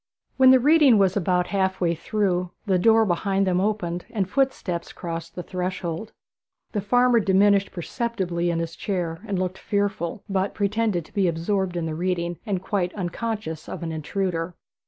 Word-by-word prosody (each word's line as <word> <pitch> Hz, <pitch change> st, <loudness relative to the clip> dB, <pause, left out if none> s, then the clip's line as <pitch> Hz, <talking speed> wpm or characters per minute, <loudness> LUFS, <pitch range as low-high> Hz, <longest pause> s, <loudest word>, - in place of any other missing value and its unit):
When 260 Hz, -1 st, +7 dB
the 260 Hz, 0 st, +8 dB
reading 290 Hz, -3 st, +6 dB
was 190 Hz, -2 st, +3 dB
about 180 Hz, -2 st, +1 dB
half 190 Hz, -1 st, +1 dB
way 170 Hz, -2 st, +2 dB
through, 180 Hz, 0 st, -1 dB, 0.2 s
the 190 Hz, -3 st, +2 dB
door 225 Hz, +3 st, +5 dB
behind 195 Hz, +1 st, +1 dB
them 185 Hz, -1 st, +1 dB
opened, 180 Hz, -4 st, -2 dB
and 200 Hz, -5 st, -1 dB
footsteps 200 Hz, -9 st, -1 dB
crossed 165 Hz, -1 st, -6 dB
the 180 Hz, -, -5 dB
threshold. 180 Hz, +1 st, -4 dB, 0.6 s
The 205 Hz, -, -1 dB
farmer 245 Hz, +3 st, +4 dB
diminished 200 Hz, 0 st, +3 dB
perceptibly 180 Hz, -3 st, -2 dB
in 170 Hz, -, 0 dB
his 165 Hz, 0 st, -3 dB
chair, 175 Hz, -3 st, -3 dB
and 200 Hz, -2 st, -1 dB
looked 185 Hz, 0 st, -2 dB
fearful, 200 Hz, -3 st, -2 dB
but 195 Hz, -1 st, -1 dB
pretended 205 Hz, -4 st, 0 dB
to -, -, -20 dB
be 195 Hz, -3 st, +2 dB
absorbed 175 Hz, +2 st, -1 dB
in 170 Hz, -, -1 dB
the 160 Hz, -, -3 dB
reading, 175 Hz, 0 st, -2 dB
and 190 Hz, -3 st, -1 dB
quite 185 Hz, -3 st, -1 dB
unconscious 190 Hz, -3 st, -4 dB
of -, -, -6 dB
an 165 Hz, -, -3 dB
intruder. 165 Hz, +1 st, -2 dB
190 Hz, 170 wpm, -24 LUFS, 175-205 Hz, 0.6 s, the